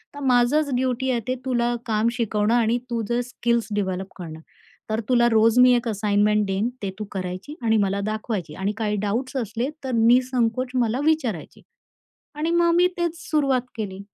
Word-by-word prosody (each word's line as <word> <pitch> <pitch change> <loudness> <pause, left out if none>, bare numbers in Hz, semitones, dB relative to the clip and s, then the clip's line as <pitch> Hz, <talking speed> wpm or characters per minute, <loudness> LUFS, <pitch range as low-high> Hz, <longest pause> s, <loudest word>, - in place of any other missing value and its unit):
तर - - -7
माझंच 260 +4 +3
ड्युटी 255 +1 0
आहे, 240 - +1
ते 255 - 0
तुला 240 -2 +1
काम 220 0 +1
शिकवणं 220 -2 0
आणि 235 0 +2
तुझे 235 +1 -1
स्किल्स 235 -2 -1
डेव्हलप 190 -2 -2
करणं. 160 -4 -8 0.5
तर 220 +1 0
तुला 240 -1 +4
रोज 225 +1 +4
मी 250 0 +7
1 240 0 -1
असाइनमेंट 210 0 +2
देईन, 195 +4 0
ते 195 - -1
तू 210 - -3
करायची 185 +9 -5
आणि 225 -1 +3
मला 200 -1 +1
दाखवायची 215 -7 -4
आणि 190 +3 -1
काही 215 -2 -1
डाउट्स 235 +7 -2
असले 230 +4 -3 0.2
तर 260 - -2
निःसंकोच 245 +1 +2
मला 245 0 +1
विचारायची." 260 - -1 0.7
आणि 310 +2 -2
मग 340 0 +3
मी 355 +1 +5
तेच 340 -1 -1
सुरुवात 275 -5 +2
केली. 195 -4 -5
230 Hz, 170 wpm, -23 LUFS, 210-255 Hz, 0.7 s, मी